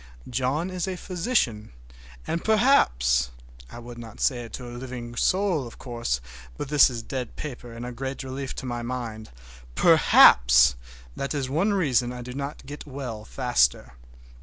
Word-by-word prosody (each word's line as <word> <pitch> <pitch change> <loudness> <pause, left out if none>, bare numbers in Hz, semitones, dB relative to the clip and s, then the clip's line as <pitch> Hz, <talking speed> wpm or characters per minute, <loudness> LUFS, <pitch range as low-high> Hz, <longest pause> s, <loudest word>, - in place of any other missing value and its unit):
John 135 +9 -1
is 185 0 -3
a 190 - -3
physician, 170 - -1 0.5
and 165 - -2
perhaps—(I - - +1
would 120 0 -10
not 115 -1 -11
say 120 -3 0
it 115 - -13
to 125 - -6
a 120 - -8
living 120 -1 -7
soul, 185 -2 +1
of 115 - -13
course, 115 - -3 0.4
but 140 - -5
this 150 -2 +6
is 120 -3 -6
dead 125 0 -5
paper 125 -5 -7
and 115 +1 -7
a 125 - -5
great 135 +3 -5
relief 135 +1 -5
to - - -6
my 120 -1 -3
mind)—perhaps 60 - +4 0.4
that 140 +2 -3
is 135 -2 -2
one 185 +8 +1
reason 130 - +1
I 125 0 -7
do 125 +1 -8
not 140 +2 -6
get 145 +2 -9
well 125 -6 -6
faster. 65 - +1
125 Hz, 160 wpm, -25 LUFS, 110-140 Hz, 0.5 s, this